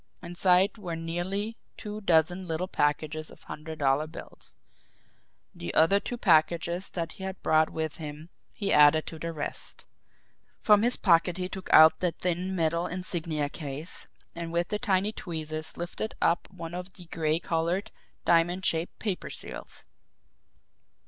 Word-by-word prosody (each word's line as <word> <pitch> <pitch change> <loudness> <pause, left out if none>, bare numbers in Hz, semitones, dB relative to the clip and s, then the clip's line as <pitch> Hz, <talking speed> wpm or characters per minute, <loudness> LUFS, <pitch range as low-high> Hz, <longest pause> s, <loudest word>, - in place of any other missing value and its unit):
Inside 180 +4 +3
were 175 -5 -4
nearly 180 +7 -3 0.2
two 210 0 -6
dozen 180 0 +2
little 165 +3 -2
packages 155 -1 -1
of - - -16
hundred 155 +1 -7
dollar 140 +1 +2
bills. 160 - -12 1.0
The 85 - -5
other 165 +6 +5
two 245 - -5
packages 170 -1 +2
that 165 -2 -4
he 190 - -10
had 190 0 -5
brought 155 0 +4
with 160 -1 -3
him 150 +1 -8 0.2
he 200 - -1
added 150 +1 +6
to 160 - -8
the 165 +1 -3
rest. 150 -3 -4 0.7
From 210 -1 +5
his 240 +2 +1
pocket 175 -1 +3
he 180 -1 -2
took 190 0 -7
out 160 0 +8
the 180 -2 0
thin 180 +1 -2
metal 170 +1 +1
insignia 170 -5 -2
case, 145 +2 -3 0.3
and 170 -1 -5
with 170 0 0
the 210 - -1
tiny 205 -3 +1
tweezers 155 -5 -5
lifted 175 +5 -4
up 170 - +2
one 165 0 -8
of 180 +1 -6
the 180 - -12
gray 160 -1 0
coloured, 170 +3 -1 0.3
diamond 175 +2 +3
shaped 165 +1 0
paper 200 -5 -3
seals. - - -9
170 Hz, 150 wpm, -28 LUFS, 160-185 Hz, 1.0 s, out